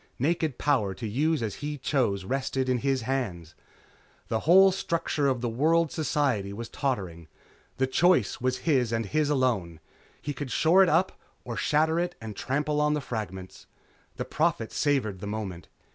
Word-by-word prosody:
Naked 155 0 0
power 110 -10 +1
to 115 +3 -5
use 150 +6 0
as 110 - -2
he 150 0 -3
chose 120 -9 0
rested 130 +2 -1
in 125 -1 +1
his 135 -1 0
hands. 100 -11 -3 0.8
The 110 -1 0
whole 190 +2 +8
structure 170 -5 -1
of 130 -3 0
world 155 +7 +2
society 135 -10 0
was 115 +2 -6
tottering. 95 - -3 0.5
The 130 - +2
choice 130 - +2
was 130 0 0
his 130 -8 +2
and 115 -1 -1
his 150 +8 0
alone. 115 - 0 0.4
He 145 - -4
could 145 -1 -6
shore 165 +8 +4
it 190 - +5
up 180 +4 +1 0.2
or - - -5
shatter 160 +2 +2
it 175 0 -2
and 110 -2 -7
trample 150 +5 -1
on 150 0 +2
the - - -1
fragments.... 95 - -6 0.5
The - - -4
Prophet 155 -8 0
savored 130 -10 0
the 100 - -6
moment. 100 -5 -5
130 Hz, 165 wpm, -27 LUFS, 110-150 Hz, 0.8 s, whole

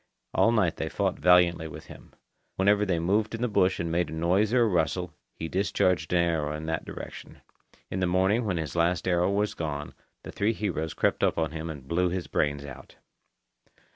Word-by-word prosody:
All 115 - +4
night 100 -8 +1
they 80 - -3
fought 95 0 -1
valiantly 90 -2 +4
with 80 - -10
him. - - -14 0.4
Whenever 100 +2 +3
they 90 -3 +1
moved 105 +7 0
in 115 - -4
the - - +2
bush 95 -4 +2
and 85 -1 -2
made 85 -1 0
a - - -7
noise 90 +6 +1
or 125 -1 +4
a - - +3
rustle, 90 -2 0 0.2
he 80 - -5
discharged 90 -2 0
an 85 -1 +3
arrow 75 -3 -1
in 80 +1 -6
that 80 0 -2
direction. - - -9 0.5
In 95 - -2
the 90 - +1
morning, 95 +6 +2
when 100 -5 -1
his 80 -2 -4
last 85 +2 +1
arrow 90 0 +2
was 105 +1 0
gone, 75 -2 -4 0.3
the - - -8
three 105 +3 0
heroes 80 -7 -3
crept - - +1
up - - +3
to 80 -1 0
him 80 +1 -6
and 70 -4 -8
blew 90 +4 +1
his 90 -1 -3
brains 70 -1 -1
out. 70 -1 -11
90 Hz, 205 wpm, -27 LUFS, 80-95 Hz, 0.5 s, All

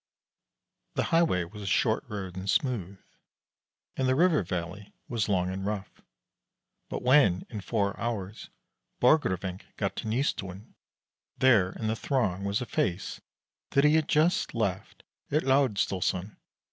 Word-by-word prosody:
The - - +1
highway 165 - +3
was 105 +5 -10
a 100 - -6
short - - +2
road 95 -4 -6
and 95 +1 -5
smooth, 100 - 0 1.0
and 130 - 0
the 130 - +3
river 170 -1 +4
valley 90 +3 -5
was 115 -4 -1
long 90 -2 +1
and 95 +1 -4
rough; 100 -1 -4 0.9
but - - -4
when, 125 -9 +4
in 105 -3 -5
four 100 0 -1
hours, 110 -4 -4 0.5
Borgrevinck 95 - +2
got 100 -2 -1
to - - -4
Nystuen, 110 -4 -2 0.6
there 105 -8 +4
in 110 - -6
the 110 +1 0
throng 105 -8 -1
was 100 +3 0
a - - -2
face 95 -3 -2 0.5
that 140 - +3
he 150 0 +5
had 160 -1 +3
just 155 -1 +2
left 100 -5 -2 0.3
at 150 +2 +1
Laersdalsoren. 105 -7 +1
105 Hz, 140 wpm, -28 LUFS, 95-130 Hz, 1.0 s, he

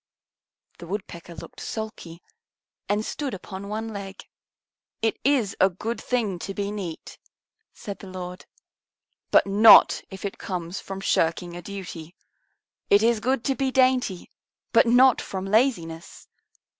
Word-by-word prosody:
The 170 - -9
Woodpecker 175 -3 -7
looked - - -11
sulky 215 -6 -7 0.7
and 210 +1 0
stood 280 -7 -4
upon 195 +1 -8
one 220 +2 -4
leg. 195 -1 -8 0.8
"It 225 - 0
is 260 -7 +2
a 190 - +5
good 215 +5 -5
thing 220 -8 -1
to 195 +3 -6
be 200 0 -2
neat," 185 -6 -7 0.5
said 200 -2 -8
the 195 - -10
Lord, 180 -1 -8 0.8
"but - - +5
not 205 +3 +7
if 190 0 -8
it 200 - -5
comes 180 -1 -4
from 195 0 -7
shirking 170 -1 0
a 175 - -7
duty. 175 -3 -8 0.7
It 205 +2 +5
is 230 -1 +3
good 255 +2 0
to 270 - +2
be 270 -1 0
dainty, 255 -8 +1 0.4
but - - +5
not 250 +2 +5
from 190 -1 -5
laziness. 195 -7 -1
200 Hz, 140 wpm, -25 LUFS, 180-225 Hz, 0.8 s, not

